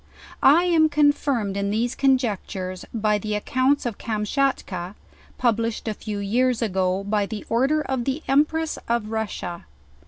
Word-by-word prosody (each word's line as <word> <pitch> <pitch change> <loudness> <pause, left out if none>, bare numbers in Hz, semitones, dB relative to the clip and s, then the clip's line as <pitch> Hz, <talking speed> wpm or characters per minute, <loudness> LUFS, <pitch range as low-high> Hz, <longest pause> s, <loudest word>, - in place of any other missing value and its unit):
I 310 +6 +6
am 330 -3 +4
confirmed 290 -8 +1
in 200 0 -1
these 230 +4 0
conjectures, 210 -8 -1
by 215 -2 +1
the 210 0 -2
accounts^of 255 -2 0
Kamschat 230 +5 0
ka, 185 +1 -6 0.4
published 230 -2 0
a 220 - 0
few 210 0 -6
years 235 +4 +1
ago 190 -2 0
by 200 0 0 0.2
order 270 +6 +2
of 260 -4 -2
the 275 +3 -2
Empress 305 +3 +1
of 230 -2 -1
Russia. 210 -6 -4
230 Hz, 135 wpm, -23 LUFS, 205-270 Hz, 0.4 s, I